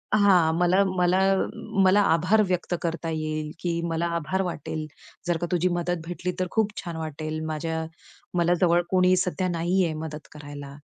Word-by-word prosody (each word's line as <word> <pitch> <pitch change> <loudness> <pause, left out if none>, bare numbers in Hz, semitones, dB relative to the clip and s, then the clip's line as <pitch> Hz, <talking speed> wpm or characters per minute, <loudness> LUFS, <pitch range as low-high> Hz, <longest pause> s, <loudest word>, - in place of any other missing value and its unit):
हां, 185 -6 +5
मला 180 +3 +4
मला 180 +1 +3 0.7
मला 200 +2 +5
आभार 190 +4 +3
व्यक्त 180 -1 -1
करता 165 -1 -2
येईल, 155 -1 -3
की 170 -1 -1
मला 165 +1 -1
आभार 185 +4 -1
वाटेल 155 -2 -4 0.4
जर 170 -1 +1
का 175 - -3
तुझी 180 +1 +2
मदत 175 -1 -2
भेटली, 180 +1 -3
तर 185 - 0
खूप 220 -2 +1
छान 170 -3 -5
वाटेल. 155 0 -4
माझ्या 160 +1 -3 0.5
मला 175 +1 +3
जवळ 175 -1 +4
कोणी 185 0 +4
सध्या 180 +1 0
नाहीये 175 0 +1
मदत 150 -1 -7
करायला. 145 -2 -9
170 Hz, 160 wpm, -25 LUFS, 160-180 Hz, 0.7 s, हां